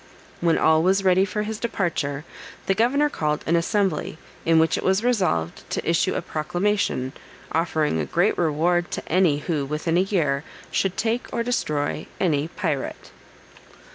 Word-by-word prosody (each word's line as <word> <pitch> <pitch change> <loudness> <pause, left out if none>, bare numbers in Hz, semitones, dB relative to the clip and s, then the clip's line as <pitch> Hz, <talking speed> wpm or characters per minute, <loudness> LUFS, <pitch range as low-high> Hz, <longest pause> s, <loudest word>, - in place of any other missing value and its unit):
When 170 -1 +2
all 160 0 +4
was 190 +3 +2
ready 190 0 +4
for 210 +2 -2
his 215 0 -4
departure, 160 - -2 0.4
the 195 - +2
governor 260 +8 +3
called 150 - -2
an 165 - +2
assembly, 180 -2 0 0.3
in 165 0 +4
which 160 0 +4
it - - -3
was 190 +3 +2
resolved 185 - 0
to - - -3
issue - - +2
a - - -2
proclamation, 170 -4 -1 0.4
offering 155 - +1
a 75 - -1
great 175 +5 +2
reward 170 +2 +1
to - - -5
any 175 -5 +3
who, 155 -5 0
within 155 +4 -1
a - - +5
year, 155 -8 0 0.3
should 195 -1 0
take 230 +2 -1
or 235 - -1
destroy 150 -12 -1
any 155 -5 +1
pirate. 160 -6 -4
170 Hz, 160 wpm, -24 LUFS, 150-195 Hz, 0.4 s, a